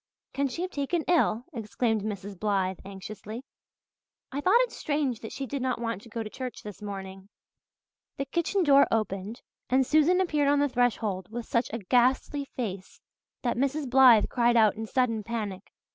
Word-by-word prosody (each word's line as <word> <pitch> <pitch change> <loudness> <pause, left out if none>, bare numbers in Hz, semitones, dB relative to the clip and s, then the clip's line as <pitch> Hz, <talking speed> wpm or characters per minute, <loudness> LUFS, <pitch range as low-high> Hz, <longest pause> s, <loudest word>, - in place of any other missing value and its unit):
"Can 280 0 0
she 330 +7 -4
have 370 - -4
taken 305 +4 -1
ill?" 280 -9 +2
exclaimed 225 -1 -1
Mrs. 200 -2 -6
Blythe 190 -3 0
anxiously. 205 +4 -8 0.9
"I 280 +2 -3
thought 385 +10 +5
it - - 0
strange 285 -6 -1
that 225 - -8
she 275 - -4
did 275 +1 -4
not 255 -1 -1
want 230 -4 -3
to 230 - -14
go 230 +1 -4
to 215 - -7
church 255 -2 -6
this 210 0 -9
morning." 195 -1 -7 0.9
The 275 - -2
kitchen 340 +6 0
door 280 -3 +6
opened 215 +1 -2 0.3
and 260 +1 +3
Susan 310 +6 +4
appeared 300 -6 +1
on 290 +1 +4
the 285 0 +2
threshold 220 -7 0
with 235 +1 -5
such 235 +1 0
a 230 - -2
ghastly 255 +6 +1
face 200 -8 -6 0.4
that 240 -2 0
Mrs. 275 +2 0
Blythe 250 -4 +7
cried 240 -1 +2
out 215 -2 +5
in 220 +1 -5
sudden 230 -2 +1
panic. 210 -4 -5
240 Hz, 175 wpm, -28 LUFS, 210-275 Hz, 0.9 s, Blythe